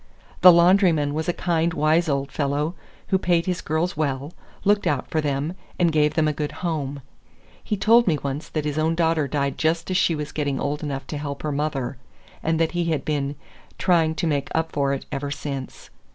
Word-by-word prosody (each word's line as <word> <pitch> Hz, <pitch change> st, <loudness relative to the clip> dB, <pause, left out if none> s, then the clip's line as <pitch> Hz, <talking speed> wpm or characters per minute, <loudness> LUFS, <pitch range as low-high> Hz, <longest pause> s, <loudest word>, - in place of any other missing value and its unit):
The 180 Hz, -, +11 dB
laundryman 170 Hz, -4 st, +4 dB
was 160 Hz, +3 st, -2 dB
a -, -, +4 dB
kind, 170 Hz, -1 st, 0 dB
wise 155 Hz, +2 st, +2 dB
old 140 Hz, -1 st, -1 dB
fellow, 145 Hz, +3 st, -1 dB, 0.4 s
who 190 Hz, -, +3 dB
paid 170 Hz, -2 st, +2 dB
his 180 Hz, -2 st, -2 dB
girls 160 Hz, +4 st, -1 dB
well, 145 Hz, 0 st, -2 dB, 0.3 s
looked 205 Hz, +1 st, +2 dB
out 140 Hz, -3 st, 0 dB
for 160 Hz, -, +1 dB
them, 145 Hz, +2 st, -1 dB, 0.2 s
and 170 Hz, -2 st, +3 dB
gave 150 Hz, -1 st, +2 dB
them 155 Hz, -1 st, +3 dB
a 150 Hz, -, +1 dB
good 150 Hz, 0 st, -3 dB
home. 145 Hz, -4 st, -3 dB, 0.6 s
He 210 Hz, -, -2 dB
told 230 Hz, +3 st, +5 dB
me 160 Hz, -4 st, +3 dB
once 140 Hz, +2 st, -4 dB
that 155 Hz, -2 st, -2 dB
his 150 Hz, 0 st, -1 dB
own 160 Hz, +1 st, +1 dB
daughter 165 Hz, -3 st, +1 dB
died 140 Hz, 0 st, -2 dB
just 165 Hz, +3 st, 0 dB
as 185 Hz, -, +2 dB
she 170 Hz, -3 st, +2 dB
was 150 Hz, -1 st, -5 dB
getting 145 Hz, -3 st, -2 dB
old 145 Hz, +1 st, -2 dB
enough 135 Hz, -3 st, -4 dB
to 150 Hz, -, -5 dB
help 140 Hz, -1 st, -5 dB
her 150 Hz, -, -1 dB
mother, 140 Hz, -3 st, -2 dB, 0.4 s
and 160 Hz, 0 st, 0 dB
that 165 Hz, -1 st, +2 dB
he 175 Hz, -1 st, -1 dB
had 160 Hz, -3 st, -1 dB
been 145 Hz, -2 st, -1 dB, 0.4 s
"trying 165 Hz, -3 st, +2 dB
to 165 Hz, -, -2 dB
make 145 Hz, -3 st, 0 dB
up 160 Hz, 0 st, 0 dB
for 140 Hz, -1 st, 0 dB
it 140 Hz, -, -3 dB
ever 140 Hz, +1 st, -3 dB
since." 140 Hz, -2 st, -6 dB
155 Hz, 210 wpm, -23 LUFS, 145-170 Hz, 0.6 s, The